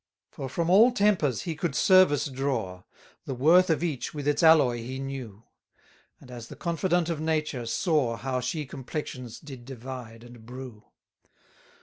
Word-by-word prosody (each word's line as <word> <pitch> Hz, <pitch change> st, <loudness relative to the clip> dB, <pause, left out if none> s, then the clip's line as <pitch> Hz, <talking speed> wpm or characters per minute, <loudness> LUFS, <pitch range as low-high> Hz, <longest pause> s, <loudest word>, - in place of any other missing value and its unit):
25 -, -, -29 dB
For 135 Hz, -2 st, -6 dB
from 170 Hz, 0 st, 0 dB
all 220 Hz, +6 st, +7 dB
tempers 200 Hz, -, +1 dB
he 170 Hz, -, -3 dB
could 170 Hz, +2 st, -3 dB
service 185 Hz, -6 st, +5 dB
draw; 130 Hz, -, -3 dB, 0.4 s
The 135 Hz, -, -4 dB
worth 170 Hz, +8 st, +5 dB
of 160 Hz, -1 st, +1 dB
each, 155 Hz, -4 st, -3 dB
with 145 Hz, -1 st, -4 dB
its 145 Hz, -, +1 dB
alloy, 155 Hz, -7 st, +5 dB
he 125 Hz, +3 st, -6 dB
knew; 130 Hz, -6 st, -7 dB, 0.8 s
And, 125 Hz, -, -15 dB
as 120 Hz, -2 st, -8 dB
the -, -, -10 dB
confidant 170 Hz, 0 st, 0 dB
of 160 Hz, -3 st, -2 dB
Nature, 155 Hz, -6 st, -1 dB
saw 140 Hz, -3 st, +1 dB
How 130 Hz, 0 st, -2 dB
she 150 Hz, +5 st, -3 dB
complexions 130 Hz, -2 st, -7 dB
did 135 Hz, -5 st, -11 dB
divide 125 Hz, -2 st, -9 dB
and 120 Hz, -1 st, -14 dB
brew. 125 Hz, -2 st, -10 dB
135 Hz, 160 wpm, -27 LUFS, 125-160 Hz, 0.8 s, all